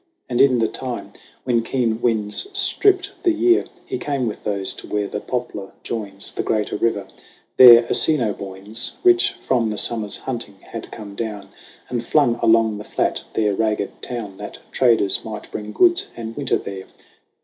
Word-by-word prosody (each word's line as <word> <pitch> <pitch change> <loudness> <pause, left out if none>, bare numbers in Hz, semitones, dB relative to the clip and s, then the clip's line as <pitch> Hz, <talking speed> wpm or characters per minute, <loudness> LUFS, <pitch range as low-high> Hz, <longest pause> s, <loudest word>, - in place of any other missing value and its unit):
And 120 -2 +1
in 130 -2 +5
the 115 -1 +2
time 125 -2 -6 0.3
when 120 -2 +1
keen 115 -2 -1
winds 110 - 0
stripped 395 0 +2
the 360 - +3
year 355 +2 +3 0.2
He 380 - -4
came 140 -3 -2
with 110 - -5
those 100 -2 -1
to - - -12
where 105 -1 -1
the 105 - -4
Poplar 105 -5 -5
joins 100 -4 -5
The - - -3
greater 105 -2 -1
river. 105 -2 0 0.5
There 120 -2 +10
Assinoboines, 105 -5 +1
Rich 360 -1 +4
from 120 -4 0
the 105 - -4
Summer's 110 -3 +1
hunting, 120 -6 -6
had 115 - -9
come 105 -3 -9
down 105 -2 -5 0.4
And 120 -2 -3
flung 120 -3 +2
along 110 -2 +3
the - - -7
flat - - -1
their 105 -2 +1
ragged 105 -1 -2
town, 110 -6 -6
That - - -8
traders 115 -6 +2
might 105 -2 -8
bring 105 0 -6
goods 360 - +3
and 115 -1 -6
winter 140 -3 0
there. 95 -1 -8
115 Hz, 165 wpm, -21 LUFS, 105-125 Hz, 0.5 s, There